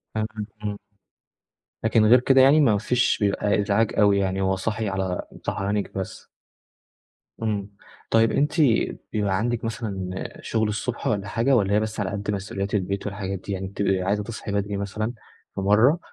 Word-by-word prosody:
فاهمِك، 110 0 0 0.4
آه. 105 -1 -3 1.1
لكن 110 -1 +4
غير 120 +4 +7
كده 135 +2 +5
يعني 140 +4 +6
ما 115 -8 +4
فيش 125 +4 +1
بيبقى 105 0 +1
إزعاج 100 +2 +1
أوي 100 -1 +5
يعني، 95 0 0
هو 95 0 +2
صاحي 110 +2 -2
على 95 -2 -2 0.2
صحيانكِ 100 +1 -2
بس؟ 95 +1 -6 1.1
إمم، 105 -2 -2 0.4
طيب 115 0 +4
أنتِ 150 +5 +1 0.5
بيبقى 100 -3 +1
عندِك 120 +2 -1
مثلًا 95 -5 -4
شغل 110 -1 0
الصبح 110 +3 -3
والًا 100 -2 0
حاجة، 120 +6 +2
والّا 100 -4 +2
هي 105 - +4
بس 110 0 -3
على 100 -3 -1
قد 105 0 -3
مسؤوليات 100 0 -4
البيت 100 0 -2
والحاجات 100 -2 -4
دي؟ 100 - -7
يعني 95 0 -3
بتبقي 95 -1 0
عايزة 100 +3 0
تصحي 110 -1 -6
بدري 100 0 -1
مثلًا 105 +3 -3 0.4
في - - -2
مرة، 110 - +4
105 Hz, 165 wpm, -24 LUFS, 100-110 Hz, 1.1 s, غير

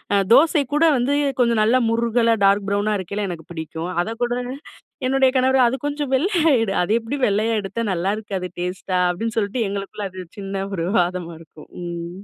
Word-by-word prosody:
அ - - +5 0.2
தோசை 300 +2 +5
கூட, 305 - +3
வந்து 255 +4 +1 0.3
கொஞ்சம் 235 -3 +3
நல்லா 245 +4 +4
முறுகலா, 230 0 +2
டார்க் 200 0 +3
ப்ரௌனா 205 +1 0
இருக்கைல 200 +2 -3
எனக்கு 165 0 -8
பிடிக்கும். 160 +2 -5
அதக்கூட 230 +3 -2 0.8
என்னுடைய 265 0 +3
கணவர் 260 0 +4
அது 240 - 0
கொஞ்சம் 290 -1 -2
வெள்ளையா 330 +2 +2
எடு, 220 -4 0
அது 180 - -1
எப்படி 230 +5 -4
வெள்ளையா 215 +3 +1
எடுத்தா 200 +4 -4
நல்லாருக்காது 195 +1 -2
டேஸ்ட்டா, 180 +1 -2
அப்டின்னு 225 +5 -3
சொல்ட்டு 215 +2 -1
எங்களுக்குள்ள 200 +1 -4
அது 185 0 -8
சின்ன 195 0 -4
ஒரு 165 -3 -2
வாதமா 175 -1 -1
இருக்கும். 155 -1 -15
ம். 170 0 -5
210 Hz, 165 wpm, -21 LUFS, 185-245 Hz, 0.8 s, அ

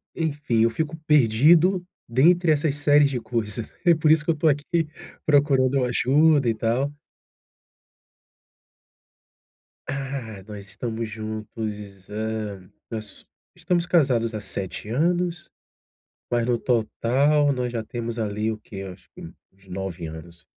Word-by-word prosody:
enfim, 145 -8 0
eu 115 - +4
fico 160 +5 -3
perdido 155 - +5 0.3
dentre 165 +7 +4
essas 145 -1 +1
séries 145 0 +4
de 125 - -2
coisas. 110 -2 -3 0.2
É 170 -1 +6
por 155 0 +3
isso 155 -1 +4
que 165 - +3
eu - - -1
estou 155 +1 +2
aqui 150 +3 0 0.4
procurando 140 -3 +3
uma 125 - +1
ajuda 140 +2 +3
e - - +2
tal. 120 +6 0 3.0
Ah, 135 -7 -5
nós 105 -2 -9
estamos 110 +3 -4
juntos, 110 -2 -6
hã, 105 -3 -4 0.2
nós 110 -2 -6 0.3
estamos 175 -1 0
casados 125 -10 +2
há 105 - -4
7 95 +1 -4
anos. 175 +5 0 0.8
Mas 120 -1 +1
no 120 -1 +1
total, 135 +5 +2
nós 125 -1 -2
já 115 -2 -2
temos 115 +1 -5
ali 105 +1 -1
o 110 - -5
que 100 -2 -9
acho 95 -2 -11
que - - -11
uns 95 0 -15
9 90 -2 -5
anos. 85 +2 -11
120 Hz, 135 wpm, -24 LUFS, 110-150 Hz, 3.0 s, É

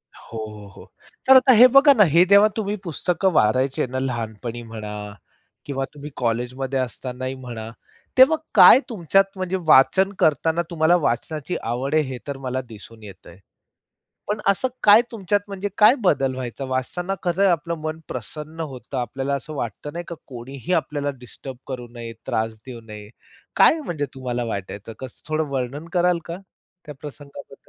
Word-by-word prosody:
हो, 115 - -11
हो, 105 -2 -8
हो. - - -15 0.4
तर 265 - +8
आता 260 0 +7
हे 245 +3 +9
बघा 275 +3 +7
ना 215 -5 +6
हे 170 +1 +7
जेव्हा 200 +2 +6
तुम्ही 205 -1 -1
पुस्तक 180 +3 -2
वाचायचे 130 +6 +2
ना 130 +1 -4
लहानपणी 120 -2 -4
म्हणा 110 -2 -7 0.7
किंवा 135 -1 -3
तुम्ही 145 +1 -9
कॉलेजमध्ये 125 +3 -2
असतानाही 130 +1 -4
म्हणा, 120 -4 -8 0.5
तेव्हा 290 +5 +7 0.2
काय 260 - +9
तुमच्यात 195 0 +1
म्हणजे 185 0 -2
वाचन 190 +8 +5
करतांना 160 +2 +2
तुम्हाला 165 +1 +3
वाचनाची 150 +3 -2
आवड 130 +6 -2
आहे 155 - +4
हे 130 -2 -6
तर 140 -1 -4
मला 130 +1 -2
दिसून 110 0 -13
येतंय. 100 -1 -13 0.9
पण 210 +1 -2
असं 200 +6 +2 0.2
काय 210 +2 +8
तुमच्यात 205 -2 0
म्हणजे 200 0 -4
काय 215 +5 +7
बदल 135 -7 +2
व्हायचा? 130 +1 -5
वाचताना 175 +9 -3
कसयं 185 +2 +2
आपलं 170 +1 -1
मन 155 +1 -4
प्रसन्न 150 +6 -7
होतं, 135 -2 -7
आपल्याला 135 +3 -3
असं 150 +3 -7
वाटतं 135 +5 -5
नाही 175 0 -6
का 170 - -6
कोणीही 135 +6 -6
आपल्याला 145 -3 -1
डिस्टर्ब 125 +1 -10
करू 125 -3 -6
नये, 115 -1 -7
त्रास 110 0 -2
देऊ 120 -2 -8
नये. 105 -1 -10 0.5
काय 325 - +5
म्हणजे 155 - -3
तुम्हाला 125 -2 -3
वाटायचं? 100 +1 -6
कसं 130 +2 -11
थोडं 155 -1 -1
वर्णन 135 +5 -4
कराल 175 -1 +2
का 170 +1 -5 0.5
त्या 150 -2 -9
प्रसंगाबद्दल? 145 -1 -10
140 Hz, 160 wpm, -22 LUFS, 125-175 Hz, 0.9 s, हे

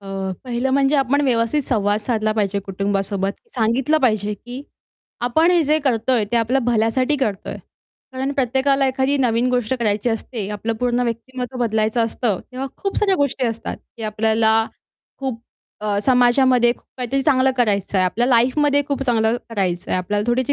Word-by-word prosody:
अ, 195 -1 -4
पहिलं 250 +1 -1
म्हणजे 275 +2 +3
आपण 275 +1 +2
व्यवस्थित 245 +3 +1
संवाद 210 -3 +1
साधला 215 -1 0
पाहिजे 205 -2 0
कुटुंबासोबत, 195 0 -2 0.2
सांगितलं 255 +7 +1
पाहिजे, 210 -4 +1
की 245 +6 -9 0.6
आपण 315 +8 +3
हे 350 -2 +4
जे 305 +2 +2
करतोय, 245 -4 +1
ते - - +3
आपल्या 235 +4 +2
भल्यासाठी 245 +5 +1
करतोय. 215 -8 -3 0.6
कारण 265 +2 -2
प्रत्येकाला 270 +1 +1
एखादी 265 +2 +1
नवीन 240 -1 +2
गोष्ट 250 0 0
करायची 210 +1 +1
असते 225 -2 -4
आपलं 210 +2 -3
पूर्ण 245 0 +1
व्यक्तिमत्त्व 250 +2 -5
बदलायचं 220 0 +1
असतं. 225 -3 -1
तेव्हा 265 +2 -4
खूप 395 - -3
साऱ्या 395 -2 +3
गोष्टी 275 -3 0
असतात, 225 0 -4 0.2
की 225 - -9
आपल्याला 220 +1 +2 0.5
खूप 260 -4 -4 0.4
अ, 205 -1 0
समाजामध्ये 250 -1 +4
खूप - - -22
काहीतरी 255 +2 -1
चांगलं 265 -2 +3
करायचंय, 200 -5 +1
आपल्या 225 +7 +1
लाईफमध्ये 280 +4 +3
खूप 275 -1 -1
चांगलं 225 -2 +2
करायचंय, 185 -5 -1
आपल्याला 205 +4 -1
थोडीशी 255 +3 +1
240 Hz, 155 wpm, -20 LUFS, 215-265 Hz, 0.6 s, हे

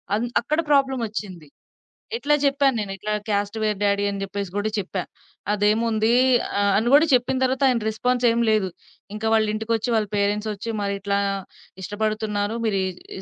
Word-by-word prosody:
అంత్ 235 +3 -1
అక్కడ 300 +7 -1
ప్రాబ్లమ్ 270 -3 +3
ఒచ్చింది. 190 -7 -7 0.7
ఇట్లా 295 -9 +2
చెప్పాను 275 -1 +3
నేను 205 -2 -4
"ఇట్లా 210 +2 -4 0.2
క్యాస్ట్ 205 +1 -1
వేరు 210 -1 0
డ్యాడీ" 200 0 +2
అని 200 -1 -4
జెప్పేసి 195 -1 -5
గూడా 205 +1 0
చెప్పా. 190 -1 -3 0.5
"అదేముంది" 220 +2 +2 0.5
ఆహ్, 200 0 +3
అని 225 +3 0
గూడా 300 +3 +7
చెప్పిన 255 +1 +2
తరువాత 260 +1 +1
ఆయన 245 -3 +2
రెస్పాన్స్ 250 +3 -1
ఏమి 235 0 +1
లేదు. 210 -3 +1 0.5
ఇంకా 220 +1 -3
వాళ్ళ 220 -1 +4
ఇంటికొచ్చి, 225 +1 -1
వాళ్ళ 215 -1 +1
పేరెంట్స్ 205 +1 0
ఒచ్చి 215 +3 -5
"మరిట్లా 200 0 -1 0.6
ఇష్టపడుతున్నారు 215 +1 -2
మీరీ 200 -3 +1 0.3
రి 190 - -7
215 Hz, 160 wpm, -23 LUFS, 200-235 Hz, 0.7 s, గూడా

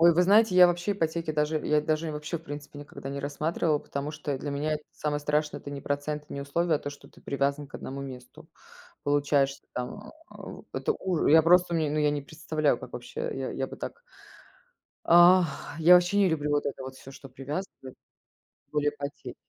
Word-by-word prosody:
Ой, 170 0 +7
вы 180 - +4
знаете, 205 +1 +5
я 180 -1 +8
вообще 175 +3 0
ипотеки 165 -3 -2
даже 150 +1 +1
я 150 0 +3
даже 155 +1 -1
вообще 150 +3 -4
в - - -19
принципе 145 -1 -8
никогда 145 -1 -9
не 140 0 -4
рассматривала, 150 +2 0
потому 140 +2 -5
что 150 -2 -4
для 145 - -4
меня 150 +2 -1
это 150 - -7
самое 150 -1 -2
страшное- 150 +1 -1
это 145 - -8
не 140 - -6
процент 145 +2 -3
и - - -9
не 140 - -4
условия, 160 +4 0
а - - +1
то, 145 - -6
что 145 0 -11
ты - - -20
привязан 140 +1 -1
к 140 - -25
1 135 +1 -6
месту. 130 -2 -10 0.6
Получаешь 145 -1 +2
ты - - -43
там, 205 +13 -5 0.2
э, - - -14
у - - -10
это 450 - 0
уж 185 - 0
Я 160 +2 +7
просто 175 +1 +4
мне, 155 -3 0
ну, 155 - 0
я 150 -1 +3
не 145 -1 -2
представляю, 155 -1 -1
как - - -10
вообще, 465 - -7
э, 480 -1 -3
я, - - -3
я - - -3
бы - - -9
так 475 - -7 1.0
Ах, 175 0 +7 0.3
я 170 +3 +8
ваще 180 +2 +4
не 200 -2 +5
люблю 150 -3 -1
вот 145 0 +1
это 140 -1 -4
вот 130 0 -7
всё, 135 - -12
что 135 - -12
привязывает, 135 +1 -7 0.7
тем - - -45
более 150 -1 +1
ипотеки. 145 0 -7
150 Hz, 220 wpm, -28 LUFS, 145-170 Hz, 1.0 s, я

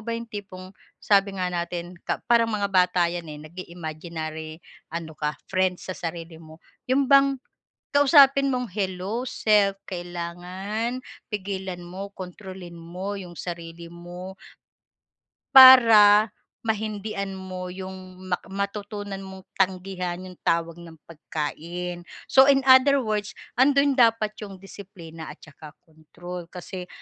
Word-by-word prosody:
ba 230 - -3
yung 230 0 -6
tipong 190 -3 -8 0.3
sabi 200 -1 +2
nga 180 - 0
natin, 175 0 -4
ka - - -1
parang 230 -1 +4
mga 205 -1 0
bata 180 -2 +3
yan 175 -1 -5
eh, 150 - -9
nag-i-imaginary 160 -2 -7 0.3
ano 165 -1 -5
ka, 150 0 -1 0.2
friends 185 -1 0
sa - - -4
sarili 165 -1 -6
mo. 160 -1 -14 0.3
Yun 270 +1 +3
bang 275 0 +6 0.6
kausapin 275 -1 +6
mong, 250 -1 -1
hello 195 +4 -2
self, 205 -5 +2
kailangan 180 +6 -4 0.3
pigilan 190 -3 -4
mo, 190 +3 -8
kontrolin 185 -1 -9
mo 180 +4 -6
yung 180 -3 -9
sarili 170 -1 -7
mo 175 +2 -9 1.2
para 225 -5 +9 0.4
mahindian 210 -3 -3
mo 185 -1 -6
yung 185 0 -9
mak 180 - -1
matutunan 200 0 -4
mong 190 -1 -10
tanggihan 185 -1 -1
yung 185 - -10
tawag 165 0 0
ng 165 -1 -12
pagkain. 170 +3 -5 0.2
So 265 +1 +6
in 270 -1 +3
other 265 +2 +7
words, 210 -1 -2 0.2
andun 280 +2 +4
dapat 230 -4 +3
yung 200 -2 -8
disiplina 180 -4 -11
at - - -11
saka 155 0 -13 0.2
kontrol, 170 +2 -10
kasi 180 0 -8
185 Hz, 125 wpm, -25 LUFS, 175-210 Hz, 1.2 s, para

